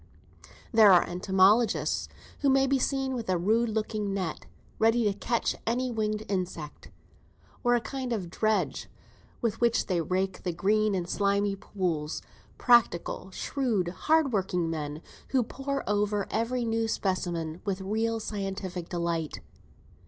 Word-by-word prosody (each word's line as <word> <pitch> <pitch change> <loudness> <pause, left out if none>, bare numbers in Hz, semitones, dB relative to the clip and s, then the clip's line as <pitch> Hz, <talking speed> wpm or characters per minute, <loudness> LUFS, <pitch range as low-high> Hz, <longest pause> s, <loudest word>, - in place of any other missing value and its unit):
There 220 -3 +7
are 180 - +6
entomologists, 190 +5 +2 0.3
who 280 - +2
may 270 0 +4
be 270 0 +2
seen 270 0 0
with 235 -5 -4
a 185 - +2
rude 220 +6 +2
looking 215 -2 -2
net, 185 -5 -4 0.3
ready 225 +2 +4
to 205 -2 +2
catch 230 +3 -1
any 250 +2 0
winged 215 -1 -1
insect, 180 -6 -4 0.7
or 245 -1 +4
a 240 - +1
kind 255 +2 -4
of 190 -7 -3
dredge, 215 +3 0 0.5
with 230 -2 -1
which 235 -1 +3
they 180 -3 0
rake 185 +3 -1
the 180 - -2
green 210 +4 +2
and 175 -2 -2
slimy 200 +1 +1
pools; 175 -6 -3 0.3
practical, 225 -6 +3
shrewd, 215 -3 -1
hard 295 - +2
working 180 -4 0
men, 150 0 -4 0.2
who 260 -2 +2
pore 275 +4 -4
over 205 -1 +1
every 235 +2 0
new 225 0 0
specimen 175 -5 -2
with 195 -2 -2
real 225 +3 -1
scientific 195 -4 -4
delight. 170 -3 -2
205 Hz, 140 wpm, -28 LUFS, 185-230 Hz, 0.7 s, There